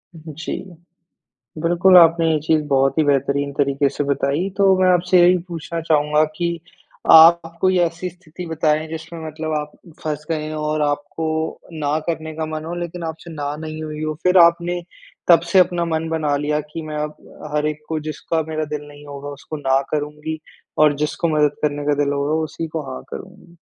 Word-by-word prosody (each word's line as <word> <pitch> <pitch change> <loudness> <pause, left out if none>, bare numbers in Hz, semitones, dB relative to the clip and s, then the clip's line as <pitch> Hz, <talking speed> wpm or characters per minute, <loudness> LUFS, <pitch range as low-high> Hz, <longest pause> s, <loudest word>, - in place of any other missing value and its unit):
जी। 160 -1 -6 1.1
बिल्कुल 175 +2 +5
आपने 165 -1 +6
ये 155 - +2
चीज़ 155 0 +2
बहुत 135 +1 +2
ही - - +5
बेहतरीन 140 0 +1
तरीके 140 0 +1
से 145 +1 -3
बताई। 140 +5 0
तो 195 -1 +5
मैं 185 - +4
आपसे 180 +1 +4
यही 180 +1 +6
पूछना 170 0 -5
चाहूँगा 150 -1 +2
कि, 170 -1 -2 0.5
आप 165 +1 +7
कोई 185 -1 +3
ऐसी 170 +1 -1
स्थिति 180 0 -11
बताएँ 155 -1 0
जिसमें 160 +1 -7
मतलब 155 0 -4
आप 150 0 -6 0.3
फँस 150 -1 -3
गए 155 -1 -2
हों 155 0 -4
और 155 0 0
आपको, 155 +2 -2
ना 150 -1 -1
करने 160 -1 -3
का 160 0 -3
मन 155 0 -5
हो 170 +2 -4
लेकिन 175 0 -5
आपसे, 160 +1 -7
ना 145 -2 -3
नहीं 155 0 -6
हुई 155 0 -5
हो? 155 0 -2
फिर 180 +1 +4
आपने, 175 +1 +4 0.5
तब 170 -2 +8
से 190 - +6
अपना 175 -1 +3
मन 165 -1 -2
बना 155 -3 0
लिया 150 +1 0
कि 165 - -5
मैं 155 -1 -6
अब, 150 0 -3 0.4
हर 150 0 +1
एक 155 0 -3
को 160 -1 -2
जिसका 155 +1 -2
मेरा 155 0 -2
दिल 145 0 -5
नहीं 145 0 -14
होगा 140 0 -8
उसको, 145 +2 -7
ना 135 -2 +2
करूँगी 150 +1 -3 0.4
और 150 -1 +5
जिसको 150 +3 -1
मदद 150 -1 +2
करने 145 -1 -1
का 150 - +3
दिल 140 - -1
होगा 145 +2 0
उसी 155 +2 -5
को, 160 0 -4
हाँ - - -7
करूँगी। 185 -2 -11
155 Hz, 190 wpm, -20 LUFS, 150-170 Hz, 1.1 s, तब